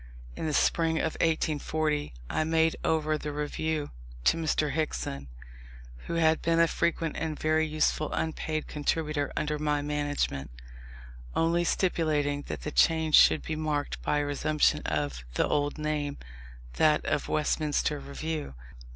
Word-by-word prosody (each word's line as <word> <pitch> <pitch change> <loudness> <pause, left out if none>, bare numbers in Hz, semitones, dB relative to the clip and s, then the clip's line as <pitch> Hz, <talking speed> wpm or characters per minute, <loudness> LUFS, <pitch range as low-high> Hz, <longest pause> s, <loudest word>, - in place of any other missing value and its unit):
In - - -3
the 155 - -1
spring 165 -1 +2
of 160 - 0
1840 155 -1 0 0.2
I 155 - 0
made 160 0 +2
over 155 -1 +1
the 150 - -4
Review 150 +1 -2 0.3
to - - +4
Mr. 155 -2 0
Hickson, 70 - -3 0.8
who 170 - -2
had 160 -1 +3
been 165 0 +2
a 170 - +6
frequent 165 -1 -1
and 155 -2 -3
very 155 0 +2
useful 155 0 0
unpaid 155 -1 -2
contributor 150 0 -1
under 150 0 -1
my 150 -1 0
management: 145 - -2 0.9
only 170 +1 +2
stipulating 155 -5 +1
that - - -5
the 150 - -4
change 160 -1 +3
should 155 - +7
be 160 - -3
marked 150 -2 -2
by 150 - 0
a 145 - +1
resumption 150 +1 +1
of 70 -5 -2
the - - +2
old 145 0 0
name, 150 -2 -2 0.6
that 155 -1 +3
of - - 0
Westminster 150 -1 0
Review. 145 - -5
155 Hz, 140 wpm, -28 LUFS, 145-160 Hz, 0.9 s, should